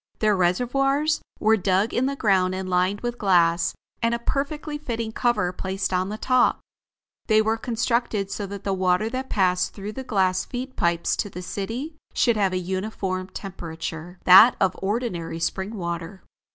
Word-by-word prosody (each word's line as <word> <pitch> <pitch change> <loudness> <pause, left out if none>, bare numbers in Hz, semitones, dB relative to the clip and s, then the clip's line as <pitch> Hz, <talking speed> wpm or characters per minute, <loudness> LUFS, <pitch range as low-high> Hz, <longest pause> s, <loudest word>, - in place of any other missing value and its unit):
Their 215 -1 +2
reservoirs 275 - +1 0.2
were 220 +1 +4
dug 195 +3 +1
in 255 +2 +1
the 280 - -2
ground 190 -6 +2
and 190 0 -4
lined 185 +2 +1
with 240 0 -4
glass, 170 -4 +3 0.3
and 230 0 +2
a 235 - -8
perfectly 295 +2 -2
fitting 230 -6 -3
cover 220 -6 +1
placed 190 +1 -3
on 185 +1 0
the 210 - -4
top. 255 +1 +2 0.7
They 215 -1 +5
were 220 +1 +2
constructed 230 -3 -1
so 205 - -4
that 200 0 -7
the 195 - -1
water 185 +3 +1
that 260 +1 -4
passed 185 -2 +1
through 205 +1 -6
the 265 - -6
glass 185 -6 +1
feed 260 +1 -6
pipes 170 -3 +1
to 205 - -2
the 180 -1 -8
city 240 - -5 0.2
should 235 -2 +3
have 200 -3 +2
a 185 - -1
uniform 185 0 -3
temperature, 170 -2 -7
that 195 +7 +9
of 190 -1 +2
ordinary 190 -6 -2
spring 190 +5 -2
water. 170 0 -5
200 Hz, 170 wpm, -24 LUFS, 185-235 Hz, 0.7 s, that